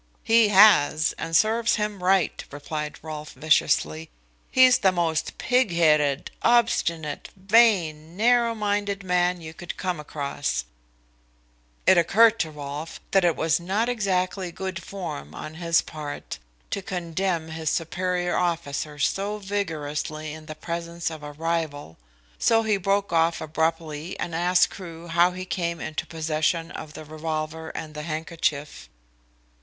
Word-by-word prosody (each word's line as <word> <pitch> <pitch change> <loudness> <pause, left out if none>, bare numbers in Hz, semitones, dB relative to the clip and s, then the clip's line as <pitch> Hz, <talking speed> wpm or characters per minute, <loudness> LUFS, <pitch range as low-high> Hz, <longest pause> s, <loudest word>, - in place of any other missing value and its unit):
"He 225 -1 +5
has, 190 -7 +5
and 165 - -2
serves 230 +2 +2
him 210 -3 -3
right," 185 -1 +2
replied 150 +1 -5
Rolfe 155 -1 -7
viciously. 80 - +1 0.4
"He's 255 -1 +6
the 190 - +4
most 165 -3 -1
pig 250 -5 +2
headed, 150 -4 +2
obstinate, 170 -10 +1
vain, 185 -6 +3
narrow 235 +1 +3
minded 205 -1 -1
man 180 -1 +1
you 160 0 -8
could 175 +1 -8
come 180 -3 -2
across." 140 - -3 1.2
It 185 - +6
occurred 225 +6 +5
to 160 - 0
Rolfe 150 +1 -7
that 195 -1 +4
it 170 -3 +3
was 160 0 +1
not 200 +7 0
exactly 190 -5 -1
good 190 0 -5
form 160 - -7
on 155 - -7
his 165 -1 +3
part 150 - -7 0.3
to 200 - -2
condemn 175 -2 -2
his 160 -1 -2
superior 175 +2 -1
officer 155 -4 -2
so 200 +8 0
vigorously 155 -6 -3
in 155 0 -11
the 155 - -7
presence 170 +1 -4
of 155 -1 -8
a 150 0 -7
rival, 155 - -3 0.4
so 225 -1 +3
he 215 -2 +2
broke 195 0 0
off 165 0 +2
abruptly 160 +1 -2
and 170 - -3
asked 180 +2 +3
Crewe 170 -3 -9
how 170 +2 +4
he 185 0 -6
came 170 -2 -2
into 155 - -4
possession 160 +1 -1
of 155 -1 -8
the 155 - -9
revolver 155 +1 -4
and 155 -1 -6
handkerchief. 155 -1 -3
170 Hz, 140 wpm, -25 LUFS, 155-195 Hz, 1.2 s, He's